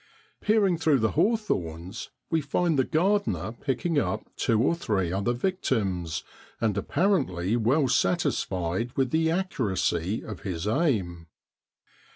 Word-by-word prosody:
Peering 205 -5 +3
through 155 -4 +3
the 110 -3 +1
hawthorns 100 - -1 0.2
we 165 -1 +2
find 155 +1 +1
the - - +5
gar 190 +10 +2
dener 195 - -3
picking 145 +4 0
up 110 -1 -2
two 115 -3 +1
or 130 +8 +3
three 105 - -1
other 100 +5 0
victims, 110 - -1 0.4
and 110 -3 +1
apparently 110 - +1
well 130 +5 +2
satisfied 115 - 0
with 130 -2 +1
the 160 0 +2
accuracy 110 - -1
of 105 -5 -7
his 90 -1 -4
aim. 105 - 0
120 Hz, 130 wpm, -27 LUFS, -, 0.4 s, the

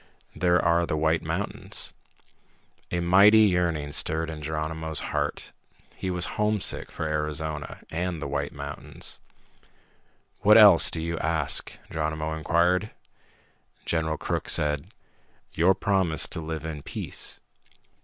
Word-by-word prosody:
There 90 0 +3
are 85 0 +2
the 75 - -1
White 80 +1 +1
Mountains." - - -3 1.0
A 85 - -1
mighty 100 +5 +6
yearning 85 -7 +1
stirred 80 +2 +1
in 80 -1 -7
Geronimo's 80 +1 -1
heart. - - -2 0.4
He 95 - -4
was 90 -1 0 0.2
homesick 105 -1 +1
for 80 - -4
Arizona, 75 -1 -3
and 85 0 -2
the 75 - -4
White 70 +1 -2
Mountains. 70 +1 -6 1.2
"What 105 +2 +6
else 100 -6 +8
do 80 - -4
you 85 0 -3
ask?" 80 -3 -1
Geronimo 80 0 -2
inquired. 85 +5 +1 1.0
General 80 -2 -1
Crook - - -3
said, 75 -1 +1 0.7
"Your 90 +4 +3
promise 95 -5 +1
to - - -4
live 80 0 -5
in 75 -2 -5
peace." - - -6
80 Hz, 125 wpm, -26 LUFS, 75-90 Hz, 1.2 s, else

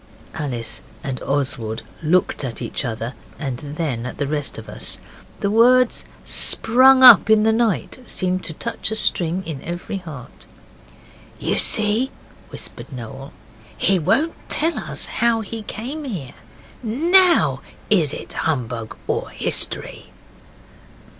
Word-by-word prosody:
Alice 130 -7 -4 0.2
and 135 -2 -4
Oswald 130 -6 -2 0.2
looked 170 0 +1
at 120 -4 -4
each - - -2
other, 115 0 -4 0.2
and 135 -4 -4
then 145 -5 -4
at - - -8
the 145 - -1
rest 145 0 -2
of - - -9
us. - - -3 0.4
The 200 - 0
words 245 +2 +4 0.2
'sprung 260 +3 +5
up 235 -4 +9
in 215 -1 +5
the 220 - +3
night' 225 0 0
seemed 185 -1 -2
to 165 - -6
touch 230 +9 -3
a 220 - -3
string 180 -3 +1
in 155 -5 -6
every 175 +5 -5
heart. 155 -9 -11 0.9
'You - - -1
see,' 215 +5 +4 0.4
whispered - - -7
Noel, 135 +2 -8 0.5
'he 195 -1 +2
won't 225 - +1 0.2
tell 325 +2 +1
us - - -3
how 235 -1 0
he 220 +1 -6
came 255 +9 -6
here. 170 - -6 0.5
NOW, 340 - +3 0.3
is 165 -9 +3
it - - -7
humbug 120 -7 -3
or - - -2
history? - - 0
180 Hz, 135 wpm, -21 LUFS, 135-230 Hz, 0.9 s, up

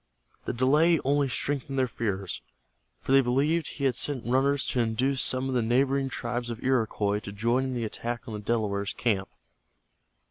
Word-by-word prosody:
The - - -2
delay 150 +7 +4
only 140 0 +2
strengthened 135 +1 -2
their 130 -1 +2
fears, 100 -5 -3 0.6
for - - -4
they 135 0 +7
believed 145 +6 +1
he 140 - -6
had 135 -2 +3
sent 130 0 -1
runners 135 +3 +2
to 125 - 0
induce 125 +4 +1
some 130 +1 +2
of 130 - -2
the 125 - +2
neighboring 135 +4 +1
tribes 120 -1 -3
of 115 0 -6
Iroquois 110 -5 +1
to 100 - -8
join 115 +6 0
in 130 - -3
the 120 -2 -2
attack 120 +2 -5
on 115 - -6
the 105 - -4
Delaware 105 -2 -1
camp. 100 -2 -1
125 Hz, 180 wpm, -27 LUFS, 115-135 Hz, 0.6 s, they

